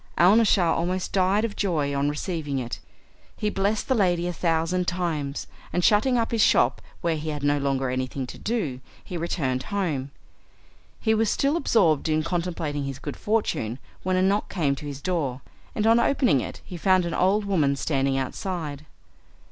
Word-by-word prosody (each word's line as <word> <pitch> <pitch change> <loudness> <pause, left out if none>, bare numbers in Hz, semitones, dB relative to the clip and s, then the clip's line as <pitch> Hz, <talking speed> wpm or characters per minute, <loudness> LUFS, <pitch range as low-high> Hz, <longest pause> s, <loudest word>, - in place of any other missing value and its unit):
Alnaschar 190 -2 +5
almost 180 +2 -2
died 195 +3 +3
of 215 - -4
joy 155 -8 0
on 140 +1 +1
receiving 150 -2 -3
it. 120 -2 -4 0.6
He 210 -1 -1
blessed 200 +2 0
the - - +3
lady 175 -6 +2
a 180 - -2
thousand 170 +2 0
times, 160 -6 -2 0.3
and, 180 - 0
shutting 220 +6 +4
up 230 -1 0
his 230 -2 +1
shop - - +4 0.2
where 170 -1 +1
he 155 0 -4
had 145 -2 -4
no 145 0 +2
longer 135 -1 0
anything 130 +1 -2
to - - -10
do, 195 - -2 0.2
he 180 - -7
returned 145 -6 -1
home. 160 -10 -1 0.9
He 220 - +2
was 220 -1 +2
still 280 +3 +1
absorbed 170 - +2
in 155 0 +2
contemplating 165 -5 -2
his 135 -2 -4
good 145 +1 -6
fortune, 205 - -1 0.2
when 185 0 0
a 185 - +3
knock 200 +2 +1
came 155 -7 +1
to 150 - -7
his 140 -1 -6
door, 145 -8 -1 0.3
and 215 - 0
on 225 +1 +5
opening 240 - +3
it - - -7
he 180 - -7
found 185 +1 +3
an 170 - -3
old 200 +3 +2
woman 155 -8 +2
standing 135 -1 0
outside. 150 +1 -4
170 Hz, 180 wpm, -25 LUFS, 145-200 Hz, 0.9 s, Alnaschar